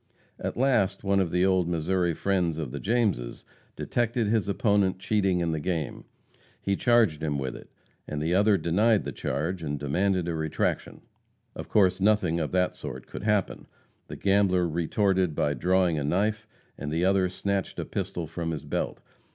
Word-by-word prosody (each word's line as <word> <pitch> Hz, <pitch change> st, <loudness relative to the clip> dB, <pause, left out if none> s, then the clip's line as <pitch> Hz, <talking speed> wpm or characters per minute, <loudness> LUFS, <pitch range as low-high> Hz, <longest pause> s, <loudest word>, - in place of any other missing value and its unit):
At -, -, -4 dB
last 120 Hz, -7 st, +2 dB
one 100 Hz, 0 st, +2 dB
of 95 Hz, -3 st, +1 dB
the 90 Hz, +2 st, +2 dB
old 95 Hz, -2 st, +2 dB
Missouri 85 Hz, +1 st, 0 dB
friends 90 Hz, -5 st, 0 dB
of 75 Hz, -6 st, -4 dB
the 70 Hz, -, -5 dB
Jameses 105 Hz, -, -1 dB, 0.3 s
detected 120 Hz, -1 st, -1 dB
his 105 Hz, -1 st, +1 dB
opponent 100 Hz, -2 st, +2 dB
cheating 95 Hz, -2 st, +1 dB
in 85 Hz, -1 st, 0 dB
the 80 Hz, -, -2 dB
game. 80 Hz, -3 st, -3 dB, 0.5 s
He 100 Hz, -, 0 dB
charged 115 Hz, -9 st, +3 dB
him 75 Hz, -2 st, -1 dB
with 65 Hz, -2 st, -3 dB
it, -, -, -12 dB, 0.4 s
and 75 Hz, -, -4 dB
the 80 Hz, +3 st, 0 dB
other 100 Hz, +2 st, +4 dB
denied 100 Hz, +6 st, +2 dB
the -, -, -4 dB
charge 85 Hz, +3 st, -3 dB
and 75 Hz, -2 st, -3 dB
demanded 90 Hz, +6 st, 0 dB
a 85 Hz, -, -1 dB
retraction. 80 Hz, -1 st, -2 dB, 0.5 s
Of -, -, -7 dB
course 95 Hz, -3 st, +3 dB
nothing 95 Hz, -5 st, +2 dB
of 80 Hz, -, -2 dB
that 90 Hz, 0 st, +1 dB
sort -, -, -7 dB
could -, -, -8 dB
happen. 105 Hz, -2 st, 0 dB, 0.4 s
The -, -, -7 dB
gambler 95 Hz, -3 st, +2 dB
retorted 90 Hz, +1 st, +1 dB
by 75 Hz, -, +1 dB
drawing 90 Hz, +3 st, +2 dB
a -, -, -2 dB
knife, 105 Hz, +8 st, 0 dB, 0.3 s
and 75 Hz, -, -4 dB
the 85 Hz, +3 st, +1 dB
other 95 Hz, -1 st, +3 dB
snatched 100 Hz, +1 st, -2 dB
a -, -, -3 dB
pistol 85 Hz, -, -4 dB
from 80 Hz, +1 st, -4 dB
his 80 Hz, -3 st, -4 dB
belt. -, -, -3 dB
90 Hz, 175 wpm, -27 LUFS, 80-100 Hz, 0.5 s, other